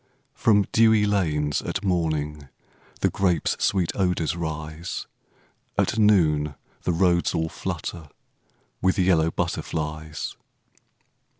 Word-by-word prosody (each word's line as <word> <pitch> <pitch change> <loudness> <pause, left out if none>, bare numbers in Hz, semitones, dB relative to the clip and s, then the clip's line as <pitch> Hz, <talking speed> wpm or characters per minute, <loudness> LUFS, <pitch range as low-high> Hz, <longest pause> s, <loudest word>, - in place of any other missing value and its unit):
From 105 -3 +3
dewey 110 -2 +5
lanes 75 -8 +1
at - - -3
morning 75 -5 -1 0.5
The - - +2
grapes' 90 -4 +1
sweet 95 -4 +2
odors 90 -4 0
rise; 80 0 -5 0.7
At 110 - +1
noon 75 -9 +3 0.3
the - - 0
roads 85 0 +2
all 80 0 0
flutter 80 -1 -5 0.7
With 95 +1 +2
yellow 90 -4 +3
butterflies. 80 -2 -3
85 Hz, 100 wpm, -25 LUFS, 80-95 Hz, 0.7 s, dewey